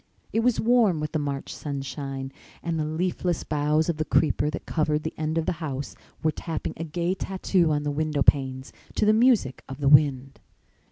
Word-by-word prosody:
It 225 - +2
was 240 0 +2
warm 225 -7 +3
with 150 0 -3
the 155 - -1
March 140 -2 -4
sunshine 135 -1 -5 0.3
and 165 -1 -1
the 155 - 0
leafless 175 +2 -1
boughs 150 +1 +1
of 170 -3 -1
the 155 - 0
creeper 150 -1 +2
that 155 - -6
covered 155 -1 0
the 160 - -4
end 155 +1 -2
of 165 - 0
the - - +1
house 140 -3 -4 0.3
were 155 - +3
tapping 160 0 -4
a 165 - -4
gay 170 +3 -1
tattoo 185 -3 0
on 145 -1 0
the 145 - -1
window 150 -1 0
panes 130 -2 +2 0.2
to - - +2
the 215 - +5
music 220 - +3
of 135 +1 -7
the 140 - 0
wind. 140 -2 +4
155 Hz, 200 wpm, -26 LUFS, 145-170 Hz, 0.3 s, the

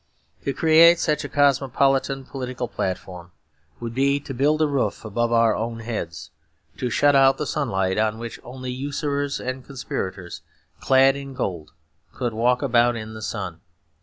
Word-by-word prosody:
To 140 - +1
create 165 +4 +6
such 150 -3 0
a - - -5
cosmopolitan 135 -1 +2
political 125 -2 -5
platform 90 -3 -5 0.5
would 115 -1 -5
be 140 +3 +2
to 135 - -7
build 145 +5 +2
a - - +3
roof 140 -5 -1
above 120 +2 -1
our 115 -2 +4
own 115 +1 -4
heads 105 -8 -5 0.5
to 125 - -2
shut 145 +4 +3
out 135 0 +5
the 150 - -2
sunlight, 95 -10 -1
on 110 0 +1
which 115 0 -7
only 130 +1 -7
usurers 140 +1 -2
and 130 0 -5
conspirators 95 -9 -5 0.4
clad 135 +1 +4
in 140 -1 -8
gold 85 -11 -4 0.4
could 120 -3 -2
walk 125 +4 +1
about 120 -2 +3
in 110 -1 -6
the 110 - -8
sun. 95 -5 -5
125 Hz, 160 wpm, -23 LUFS, 110-140 Hz, 0.5 s, create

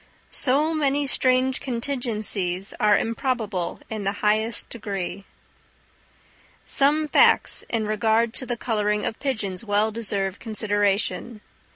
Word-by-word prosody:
So 290 +5 +2
many 290 -2 +1
strange 260 -1 +2
contingencies 215 -7 -1
are 210 -1 +4
improbable 225 -6 -2
in 215 -2 -5
the 195 0 -1
highest 215 +1 +2
degree. 200 -3 -5 1.4
Some 300 +2 +2
facts - - +3
in 225 -2 -1
regard 220 +2 +1
to 260 - -6
the 240 - -2
colouring 210 -3 -1
of 220 - -4
pigeons 220 -8 -3
well 210 0 +1
deserve 200 -3 -1
consideration. 210 0 -1
220 Hz, 110 wpm, -24 LUFS, 205-255 Hz, 1.4 s, are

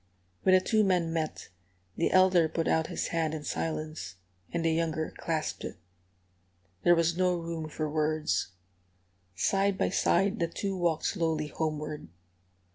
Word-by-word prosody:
When 185 - +5
the 185 - +5
two 215 +3 +2
men 180 -4 +1
met, 160 -2 -3 0.5
the 165 - +1
elder 185 -3 +5
put 165 +1 -1
out 160 0 +2
his - - -3
hand 160 -2 0
in 150 - -6
silence, 155 - -3 0.4
and 170 -1 -1
the 165 - +3
younger 160 -1 -1
clasped 160 -2 -3
it. - - -6 1.1
There 175 - +6
was 165 0 +2
no 180 0 +2
room 165 -2 -4
for 155 0 -3
words. 155 - 0 0.9
Side 195 - +1
by - - +1
side 200 +3 +2
the 170 - +1
two 195 +3 -3
walked 170 -3 0
slowly 160 -5 0
homeward. 150 - -3
165 Hz, 150 wpm, -29 LUFS, 155-180 Hz, 1.1 s, There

